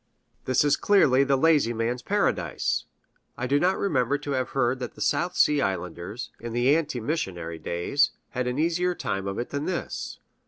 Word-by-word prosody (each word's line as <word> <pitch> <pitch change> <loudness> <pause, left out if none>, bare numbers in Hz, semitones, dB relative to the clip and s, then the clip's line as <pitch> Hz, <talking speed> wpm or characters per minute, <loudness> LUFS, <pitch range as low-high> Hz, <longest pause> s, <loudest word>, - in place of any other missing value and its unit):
This 130 +2 +3
is 145 -1 +3
clearly 145 -10 +4
the 140 0 +2
lazy 145 -5 +3
man's 120 +2 -2
Paradise. 205 +6 0 0.5
I 125 - -2
do 140 +3 +2
not 185 +4 +2
remember 145 -7 +1
to 145 0 -6
have 130 -2 -1
heard 125 0 +2
that 125 - -6
the - - -14
South 180 +1 0
Sea 150 -1 +4
Islanders, 90 +4 -4
in 115 0 -6
the 125 +4 +4
ante 155 -6 -1
missionary 90 - -3
days, 85 - +1 0.2
had 125 -1 -2
an 125 +1 -2
easier 175 +3 +1
time 95 - -3
of 100 - -3
it 120 - -4
than 140 +1 -2
this. 185 - -4
130 Hz, 185 wpm, -26 LUFS, 120-150 Hz, 0.5 s, clearly